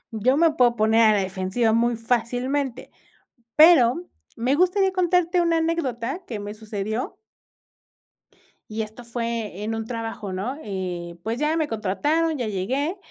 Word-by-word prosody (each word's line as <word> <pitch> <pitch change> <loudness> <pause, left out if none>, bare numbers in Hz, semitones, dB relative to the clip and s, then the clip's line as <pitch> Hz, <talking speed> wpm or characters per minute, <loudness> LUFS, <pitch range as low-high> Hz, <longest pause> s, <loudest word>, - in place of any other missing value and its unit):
Yo 255 +6 +2
me 330 0 +5
puedo 245 -4 +3
poner 220 +1 +3
a 220 -1 +6
la - - +2
defensiva 190 +4 0
muy 235 +1 +2
fácilmente. 245 +3 -2 0.6
Pero 310 -1 +6 0.3
me 250 +4 +1
gustaría 375 +3 +3
contarte 360 -1 +2
una 335 -1 +2
anécdota 320 -2 -2
que 220 -4 -5
me 205 +1 -6
sucedió. 215 - -4 1.5
Y 220 +1 -2
esto 220 +3 -9
fue 230 -4 -4
en 225 +1 -2
un 225 0 -3
trabajo, 225 -3 -5
¿no?, 205 +9 -3
eh, 180 -4 -5
pues, 225 +4 -2
ya 305 +2 +1
me 315 -2 +1
contrataron, 290 - 0
ya 245 - -2
llegué, 260 - -2
235 Hz, 145 wpm, -24 LUFS, 215-300 Hz, 1.5 s, a